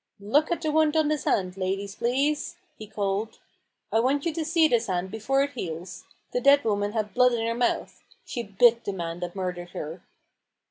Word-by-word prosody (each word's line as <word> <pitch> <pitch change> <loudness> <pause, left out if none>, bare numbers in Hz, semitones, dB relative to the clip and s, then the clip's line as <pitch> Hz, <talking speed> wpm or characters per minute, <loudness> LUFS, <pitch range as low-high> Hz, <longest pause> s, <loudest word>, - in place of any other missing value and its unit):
" - - -48
Look 310 +4 +4
at 340 - -1
the 310 - +1
wound 315 0 +3
on 310 -1 +3
this 305 -3 -1
hand, 185 -1 0
ladies, 195 +1 -2
please! 275 +7 0
" - - -43
he 215 - -8
called; 205 +1 -2 0.3
" - - -51
I 225 - +4
want 275 +5 +1
you 335 - 0
to 325 0 -2
see 325 0 +3
this 235 -5 +1
hand 185 0 -2
before 265 +6 +1
it 280 - -3
heals. 180 - -6 0.3
The 245 - -1
dead 280 +2 +6
woman 205 -1 0
had 215 -3 -2
blood 250 0 +4
in 225 -1 -1
her 230 - 0
mouth. 240 +1 -1 0.2
She 240 - -4
bit 235 +3 +3
the 200 - -2
man 170 -2 -4
that 175 0 -5
murdered 180 -2 -4
her." 160 +4 -6
225 Hz, 220 wpm, -26 LUFS, 190-280 Hz, 0.3 s, dead